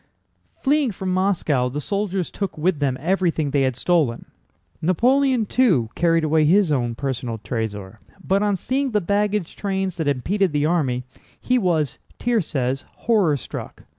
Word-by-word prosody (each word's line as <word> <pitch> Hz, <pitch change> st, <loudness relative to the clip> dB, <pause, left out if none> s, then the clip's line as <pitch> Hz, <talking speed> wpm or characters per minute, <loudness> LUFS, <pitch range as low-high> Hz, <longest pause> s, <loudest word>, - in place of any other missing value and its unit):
Fleeing 285 Hz, -1 st, +3 dB
from 190 Hz, -1 st, -3 dB
Moscow 170 Hz, -9 st, +1 dB
the 145 Hz, +4 st, -4 dB
soldiers 195 Hz, +1 st, -2 dB
took 200 Hz, -5 st, -4 dB
with 165 Hz, 0 st, +1 dB
them 135 Hz, -3 st, 0 dB
everything 170 Hz, -2 st, 0 dB
they 140 Hz, -, +2 dB
had 130 Hz, -2 st, +1 dB
stolen. 145 Hz, -4 st, +1 dB, 0.6 s
Napoleon, 250 Hz, -, +2 dB
too, 180 Hz, -, +2 dB
carried 165 Hz, -1 st, +2 dB
away 155 Hz, 0 st, +3 dB
his 180 Hz, +2 st, +4 dB
own 120 Hz, -4 st, 0 dB
personal 125 Hz, -3 st, -3 dB
trésor, 105 Hz, -2 st, -5 dB, 0.3 s
but 195 Hz, +1 st, +1 dB
on 205 Hz, -1 st, +2 dB
seeing 265 Hz, +5 st, -1 dB
the 210 Hz, -, +3 dB
baggage 205 Hz, 0 st, -1 dB
trains 190 Hz, -2 st, -2 dB
that 160 Hz, -3 st, -2 dB
impeded 175 Hz, +7 st, 0 dB
the 145 Hz, 0 st, +1 dB
army, 140 Hz, -7 st, 0 dB, 0.4 s
he 250 Hz, 0 st, +1 dB
was 165 Hz, -, 0 dB, 0.2 s
(Thiers 230 Hz, -8 st, 0 dB
says) 135 Hz, -2 st, -1 dB
horror 200 Hz, -11 st, +2 dB
struck. 125 Hz, -, -8 dB
170 Hz, 155 wpm, -22 LUFS, 135-200 Hz, 0.6 s, his